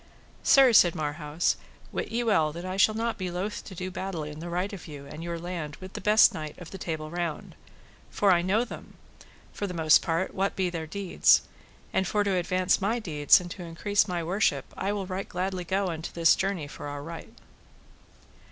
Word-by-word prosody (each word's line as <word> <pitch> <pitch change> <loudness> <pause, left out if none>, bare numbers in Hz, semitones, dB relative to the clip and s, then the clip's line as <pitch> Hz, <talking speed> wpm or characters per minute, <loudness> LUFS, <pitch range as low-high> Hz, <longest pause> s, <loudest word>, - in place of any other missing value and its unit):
Sir, 265 -3 +6
said 175 -5 +6
Marhaus, 150 +1 -1 0.3
wit - - -3
ye 235 +1 0
well 175 -9 +2
that 170 +2 -7
I 185 0 -3
shall 215 +3 +4
not 230 0 -2
be 185 -1 -2
loath 190 +5 -4
to 190 - -9
do 185 +1 -5
battle 185 -3 -4
in 150 0 -7
the 170 +2 -6
right 180 +4 -2
of 195 - -8
you 145 -3 -9
and 155 +3 -8
your 170 0 -3
land 165 -3 -5
with 185 0 -11
the - - -6
best 215 +1 +6
knight 155 -1 -6
of 175 -2 -10
the 195 - -8
Table 155 -3 -4
Round; 170 -3 -4 0.6
for 200 -2 +3
I 175 -1 +4
know 200 +7 +1
them, - - -10 0.6
for 205 - -3
the 180 - -6
most 160 -2 +5
part, 165 +3 -1
what 195 +1 -1
be 185 -2 0
their 165 -2 -4
deeds; 195 +2 +3 0.5
and 190 - +1
for 210 +2 +1
to 200 -2 0
advance 185 +2 +1
my 215 +5 +1
deeds 150 -10 +4
and 175 -1 -8
to 185 - -7
increase 200 +5 0
my 175 -2 -2
worship 190 +6 +1
I 195 - -1
will 205 -2 -2
right 185 +1 -5
gladly 185 0 -2
go 190 +2 0
unto 160 -1 -5
this 165 -1 +4
journey 190 -5 -2
for 145 - -8
our 145 0 -6
right. 165 +2 -9
180 Hz, 210 wpm, -27 LUFS, 165-195 Hz, 0.6 s, Sir